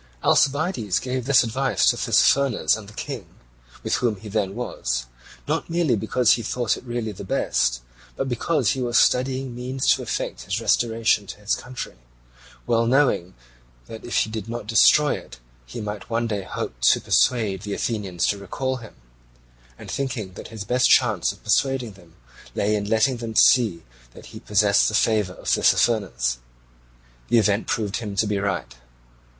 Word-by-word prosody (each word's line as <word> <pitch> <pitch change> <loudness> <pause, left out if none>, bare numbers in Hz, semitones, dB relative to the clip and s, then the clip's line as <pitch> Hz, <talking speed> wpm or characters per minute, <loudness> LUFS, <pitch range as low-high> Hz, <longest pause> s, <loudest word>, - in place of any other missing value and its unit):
Alcibiades 140 - +2
gave 130 -1 -3
this 140 -4 +5
advice 130 +4 0
to - - +4
Tissaphernes 140 -7 +3
and 105 -2 -9
the - - -15
King, - - -6 0.6
with - - 0
whom 120 -3 0
he 105 +2 -11
then 100 -2 -1
was, - - -3 0.4
not - - -2
merely 165 -7 +1
because 110 +3 +2
he 120 - +3
thought 120 0 -1
it - - -11
really 120 -2 -3
the 100 - -9
best, - - 0 0.3
but 135 - -2
because 130 +1 0
he 130 - -2
was 120 -1 +1
studying 130 0 +2
means 125 +2 -4
to - - -3
effect - - -4
his - - -3
restoration 115 -3 +1
to - - -9
his 105 +1 -1
country, 125 - -6 0.7
well 115 0 +1
knowing 125 - +2 0.5
that 110 - -10
if 120 - -5
he 110 - +1
did 110 0 -5
not 120 -2 -5
destroy 115 +7 +5
it - - -9 0.3
he - - -7
might 105 0 -6
one 115 0 0
day 105 -3 -2
hope 95 - -5
to - - +5
persuade 105 -7 +1
the 100 -1 -4
Athenians 100 -7 -2
to 100 - 0
recall 130 +7 -3
him, 115 -3 -12 0.8
and - - -9
thinking 125 -9 -3
that - - -9
his 110 -2 -7
best 125 +4 +2
chance 110 -9 +3
of - - -16
persuading 135 -4 +1
them 90 -4 -19 0.4
lay 105 +1 +1
in 105 -1 -1
letting 115 +4 +2
them 115 -1 -6
see 105 -12 +4 0.3
that - - -13
he - - -8
possessed 105 -1 +3
the 110 - -2
favour 105 -5 +1
of - - -13
Tissaphernes. 95 - +2 0.9
The 120 - +3
event 105 -1 +2
proved 105 -2 -1
him 105 -4 -6
to 100 - +2
be 105 -1 -1
right. 85 -12 -3
110 Hz, 175 wpm, -23 LUFS, 100-125 Hz, 0.9 s, this